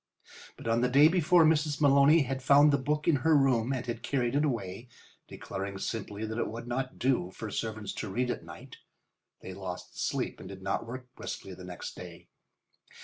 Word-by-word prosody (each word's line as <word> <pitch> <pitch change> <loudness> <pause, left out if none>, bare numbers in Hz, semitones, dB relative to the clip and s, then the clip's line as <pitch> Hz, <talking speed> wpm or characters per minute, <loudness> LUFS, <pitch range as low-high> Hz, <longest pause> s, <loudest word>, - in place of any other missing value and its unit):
But - - -8
on 115 +1 +2
the 125 - +2
day 140 +4 +7
before 175 0 +4
Mrs. 150 -2 +2
Maloney 145 +2 +5
had 135 0 -4
found 145 +3 +6
the 140 - +3
book 150 +3 -1
in 160 -4 +4
her 155 +4 +4
room 130 -3 +2
and 130 -3 -2
had 120 -2 -4
carried 125 -3 -1
it 145 +2 +2
away, 115 -4 -3 0.4
declaring 100 0 -6
sharply 105 +1 -4
that 110 +2 -4
it - - 0
would 115 +2 -7
not 130 +2 -3
do 125 -9 +1
for 105 +3 -7
servants 110 -2 -4
to 110 - -5
read 125 +5 -1
at - - -5
night; - - -11 0.6
they 95 - -8
lost 90 -1 -6
sleep - - -2
and 95 - -9
did 95 -1 -10
not 95 +3 -2
work 125 +1 -8
briskly 95 - -7
the 90 - -11
next 90 -1 -7
day. - - -11
125 Hz, 200 wpm, -29 LUFS, 105-140 Hz, 0.6 s, day